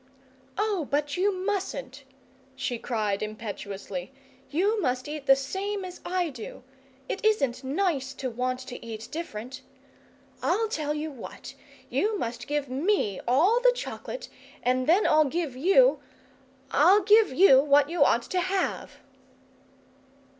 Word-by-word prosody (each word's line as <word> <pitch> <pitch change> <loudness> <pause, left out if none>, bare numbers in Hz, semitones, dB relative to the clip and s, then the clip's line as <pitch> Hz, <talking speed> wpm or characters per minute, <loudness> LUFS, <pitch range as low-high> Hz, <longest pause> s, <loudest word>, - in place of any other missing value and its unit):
"Oh, 405 -7 0
but 290 0 0
you 390 +3 +2
mustn't!" 365 -9 -4 0.5
she 245 -3 -3
cried 215 -5 -1
impetuously. 205 -3 -6 0.4
"You 405 +8 +1
must 255 -3 -1
eat 295 -1 -6
the 270 - +8
same 385 +9 -3
as 360 -1 -9
I 355 -3 -1
do! 245 0 -9 0.4
It 390 - -4
isn't 280 - +1
nice 275 -2 -1
to 265 - -4
want 255 +2 -2
to 250 -1 -9
eat 225 -1 -7
different. 255 -6 -6 0.8
I'll 365 - +1
tell 300 -6 -2
you 305 +1 -4
what 260 -5 -9 0.3
you 425 0 0
must 235 -7 -4
give 290 -1 -1
ME 265 - 0
all 340 - +4
the - - +5
chocolate, - - -6 0.4
and 255 +1 +1
then 365 +6 +4
I'll 310 0 +5
give 305 -2 -2
YOU 390 - +4 0.7
I'll 370 +8 +5
give 425 +1 +5
you 270 -2 +7
what 285 0 +4
you 340 -4 +4
ought 235 -3 +3
to 365 - -2
have!" 375 +1 -2
295 Hz, 140 wpm, -27 LUFS, 255-380 Hz, 0.8 s, the